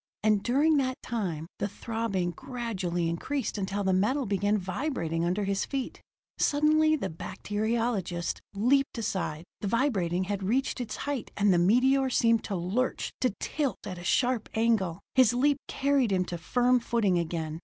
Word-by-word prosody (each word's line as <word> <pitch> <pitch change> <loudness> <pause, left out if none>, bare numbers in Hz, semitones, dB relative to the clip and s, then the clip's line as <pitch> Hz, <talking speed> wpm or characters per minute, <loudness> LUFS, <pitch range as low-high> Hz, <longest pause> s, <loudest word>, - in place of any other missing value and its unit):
And 215 -2 +3
during 290 +7 +3
that 260 -2 0
time, 180 -10 -3
the - - 0
throbbing 205 -4 -2
gradually 200 -8 -3
increased 215 +9 -2
until 200 +1 -2
the 190 -1 +2
metal 245 +9 +1
began 205 +1 +1
vibrating 180 - -2
under 180 +4 0
his 195 0 0
feet. 270 -2 -4 0.4
Suddenly 310 +1 +4
the 265 - -2
bacteriologist 205 -1 -2 0.2
leaped 265 +6 +2
aside. 190 -8 -2 0.2
The 205 - -3
vibrating 195 -7 +1
had 200 +1 -3
reached 250 +6 0
its 220 -3 -4
height, 280 -4 -3
and 205 -1 +4
the 175 - +3
meteor 260 +8 +4
seemed 230 -2 +3
to 200 - -3
lurch, 190 +9 -1
to 250 -6 +1
tilt 290 -4 -2
at 185 -3 -6
a - - -9
sharp 245 +4 +1
angle. 210 -6 +1
His 250 -3 +5
leap 285 +3 +3
carried 275 -5 +1
him 185 -1 +2
to 175 - -5
firm 245 +9 +2
footing 215 -6 +1
again. 160 -1 -3
215 Hz, 160 wpm, -28 LUFS, 185-255 Hz, 0.4 s, His